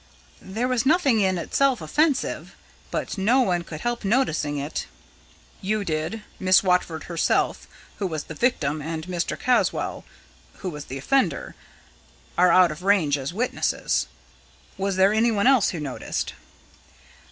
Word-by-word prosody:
"There 220 Hz, +6 st, -2 dB
was 250 Hz, -2 st, +1 dB
nothing 275 Hz, -6 st, +3 dB
in 190 Hz, -2 st, +2 dB
itself 260 Hz, +8 st, +1 dB
offensive; 280 Hz, -, 0 dB, 0.3 s
but -, -, -3 dB
no 235 Hz, +7 st, +4 dB
one 180 Hz, -7 st, +1 dB
could 155 Hz, -2 st, -8 dB
help 240 Hz, -1 st, -2 dB
noticing 195 Hz, -, +1 dB
it." 145 Hz, +2 st, -4 dB, 0.7 s
"You 205 Hz, +1 st, -1 dB
did. 160 Hz, +7 st, -3 dB, 0.2 s
Miss 185 Hz, 0 st, +5 dB
Watford 180 Hz, -3 st, +1 dB
herself, 170 Hz, -2 st, 0 dB, 0.3 s
who 200 Hz, -, -1 dB
was 155 Hz, -4 st, -4 dB
the -, -, -8 dB
victim, 155 Hz, -, 0 dB
and 160 Hz, +1 st, -4 dB
Mr. 175 Hz, -2 st, -3 dB
Caswall, 250 Hz, 0 st, 0 dB, 0.5 s
who 185 Hz, -, -6 dB
was 150 Hz, -2 st, -8 dB
the 135 Hz, -, -6 dB
offender, 270 Hz, -, 0 dB, 0.8 s
are 180 Hz, 0 st, +5 dB
out 180 Hz, -2 st, +6 dB
of 155 Hz, +3 st, -8 dB
range 185 Hz, -7 st, +3 dB
as 135 Hz, +1 st, -4 dB
witnesses. 230 Hz, +8 st, -1 dB, 0.7 s
Was 195 Hz, -1 st, -1 dB
there 190 Hz, +2 st, +4 dB
anyone 220 Hz, -2 st, +2 dB
else 255 Hz, -6 st, +5 dB
who 175 Hz, -, -4 dB
noticed?" 140 Hz, -4 st, -4 dB
190 Hz, 140 wpm, -24 LUFS, 160-235 Hz, 0.8 s, out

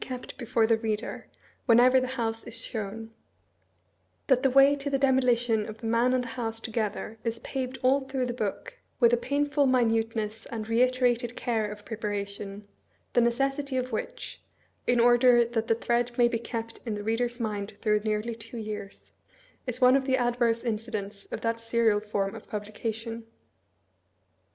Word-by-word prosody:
279 255 Hz, -1 st, -6 dB
kept -, -, -10 dB
before 235 Hz, -2 st, +2 dB
the 225 Hz, 0 st, +3 dB
reader, 220 Hz, -1 st, -3 dB, 0.4 s
whenever 250 Hz, +2 st, +6 dB
the 255 Hz, -, -2 dB
house 225 Hz, -1 st, -2 dB
is 230 Hz, 0 st, -6 dB
shown; 225 Hz, 0 st, -5 dB, 1.1 s
that 255 Hz, -2 st, +3 dB
the 270 Hz, -, +3 dB
way 275 Hz, +2 st, +6 dB
to 285 Hz, 0 st, -4 dB
the 275 Hz, -, +1 dB
demolition 245 Hz, -5 st, +2 dB
of 215 Hz, -, -8 dB
the 230 Hz, -, -9 dB
man 230 Hz, +2 st, +3 dB
and 255 Hz, -1 st, +1 dB
the -, -, -6 dB
house 225 Hz, -1 st, -2 dB
to 225 Hz, -, -6 dB
gether 220 Hz, 0 st, -3 dB
is 230 Hz, -1 st, -2 dB
paved 260 Hz, -1 st, -4 dB
all 265 Hz, +2 st, +4 dB
through 265 Hz, -1 st, -2 dB
the 245 Hz, -, -3 dB
book 215 Hz, -5 st, -4 dB, 0.2 s
with 235 Hz, -1 st, +5 dB
a -, -, +8 dB
painful 285 Hz, +3 st, +1 dB
mi 255 Hz, -1 st, +4 dB
nuteness 225 Hz, -1 st, -1 dB
and 220 Hz, -2 st, -5 dB
reiterated 245 Hz, 0 st, +2 dB
care 220 Hz, -3 st, -1 dB
of 210 Hz, 0 st, -10 dB
preparation, 205 Hz, -2 st, -5 dB, 0.5 s
the 240 Hz, -, +5 dB
necessity 270 Hz, +3 st, 0 dB
of 255 Hz, 0 st, -2 dB
which -, -, -5 dB, 0.5 s
(in 245 Hz, -1 st, +3 dB
order 240 Hz, 0 st, +6 dB
that 230 Hz, -1 st, -2 dB
the 225 Hz, -, +3 dB
thread 240 Hz, +1 st, 0 dB
may 240 Hz, -1 st, +6 dB
be 235 Hz, -1 st, -1 dB
kept 230 Hz, -1 st, -5 dB
ia 220 Hz, -, -1 dB
the 205 Hz, -, -5 dB
reader's 240 Hz, +3 st, -1 dB
mind 210 Hz, -3 st, -3 dB
through 210 Hz, -1 st, +2 dB
nearly 215 Hz, +2 st, -1 dB
two 225 Hz, +1 st, -10 dB
years) 210 Hz, -2 st, -7 dB, 0.6 s
is 250 Hz, 0 st, -3 dB
one 255 Hz, +1 st, +7 dB
of 270 Hz, -1 st, +2 dB
the 260 Hz, -1 st, +2 dB
adverse 240 Hz, -2 st, +1 dB
incidents 215 Hz, -3 st, -4 dB
of -, -, -6 dB
that 230 Hz, 0 st, -1 dB
serial 230 Hz, -2 st, +2 dB
form 205 Hz, -2 st, -2 dB
of 225 Hz, -, -10 dB
publication? 225 Hz, +2 st, -5 dB
230 Hz, 175 wpm, -28 LUFS, 220-250 Hz, 1.1 s, a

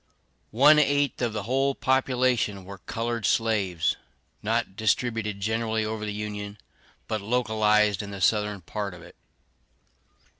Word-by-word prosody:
One 150 Hz, +5 st, +7 dB
eighth 145 Hz, -2 st, +1 dB
of 120 Hz, -2 st, +1 dB
the 105 Hz, -1 st, -4 dB
whole 135 Hz, +4 st, +1 dB
population 125 Hz, -6 st, +1 dB
were 100 Hz, 0 st, -9 dB
colored 115 Hz, 0 st, -3 dB
slaves, 100 Hz, -5 st, +1 dB, 0.4 s
not 95 Hz, -, -1 dB
distributed 110 Hz, -1 st, 0 dB
generally 110 Hz, +1 st, -1 dB
over 110 Hz, 0 st, -4 dB
the -, -, -2 dB
Union, 105 Hz, 0 st, -5 dB, 0.5 s
but 110 Hz, -1 st, -2 dB
localized 105 Hz, -3 st, +2 dB
in 105 Hz, -, -7 dB
the 100 Hz, -1 st, -7 dB
Southern 105 Hz, 0 st, +1 dB
part 100 Hz, +2 st, -5 dB
of 85 Hz, -, -13 dB
it. -, -, -15 dB
110 Hz, 135 wpm, -26 LUFS, 100-120 Hz, 0.5 s, One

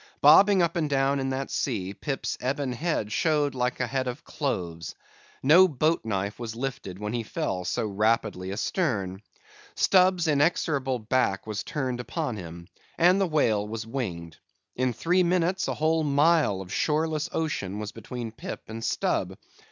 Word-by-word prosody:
Bobbing 190 Hz, +6 st, +7 dB
up 170 Hz, 0 st, 0 dB
and 155 Hz, -3 st, 0 dB
down 135 Hz, 0 st, +2 dB
in 135 Hz, 0 st, -1 dB
that 135 Hz, +1 st, -3 dB
sea, 100 Hz, -8 st, -2 dB
Pip's 135 Hz, +5 st, -3 dB
ebon 135 Hz, +1 st, -1 dB
head 135 Hz, -6 st, -2 dB
showed 150 Hz, -1 st, +1 dB
like 125 Hz, -1 st, -1 dB
a 130 Hz, -, +1 dB
head 130 Hz, +2 st, -2 dB
of 125 Hz, +2 st, -5 dB
cloves. 85 Hz, -, -4 dB, 0.5 s
No 170 Hz, +7 st, +7 dB
boat 155 Hz, +1 st, +1 dB
knife 100 Hz, -1 st, -3 dB
was 115 Hz, -2 st, -5 dB
lifted 125 Hz, -7 st, -5 dB
when 105 Hz, +2 st, -4 dB
he 120 Hz, -, -1 dB
fell 110 Hz, -, -3 dB
so -, -, -1 dB
rapidly 105 Hz, -2 st, 0 dB
astern. 100 Hz, -, -1 dB, 0.5 s
Stubb's 185 Hz, -2 st, +4 dB
inexorable 145 Hz, -3 st, +1 dB
back 110 Hz, -3 st, 0 dB
was 110 Hz, -1 st, -3 dB
turned 130 Hz, -4 st, -3 dB
upon 145 Hz, 0 st, -3 dB
him; 85 Hz, -3 st, -9 dB, 0.3 s
and 180 Hz, +3 st, +5 dB
the 195 Hz, -, +2 dB
whale 115 Hz, -10 st, +1 dB
was 110 Hz, +1 st, -5 dB
winged. 90 Hz, -10 st, -5 dB, 0.4 s
In 130 Hz, 0 st, +1 dB
three 175 Hz, +10 st, +1 dB
minutes, 180 Hz, +1 st, +1 dB
a -, -, -2 dB
whole 160 Hz, +1 st, +1 dB
mile 145 Hz, -, +3 dB
of 95 Hz, -1 st, -8 dB
shoreless 155 Hz, 0 st, 0 dB
ocean 105 Hz, -12 st, -2 dB
was 105 Hz, 0 st, -5 dB
between 120 Hz, -3 st, -7 dB
Pip 115 Hz, -, -7 dB
and 115 Hz, +1 st, -6 dB
Stubb. -, -, -1 dB
130 Hz, 160 wpm, -26 LUFS, 105-155 Hz, 0.5 s, Bobbing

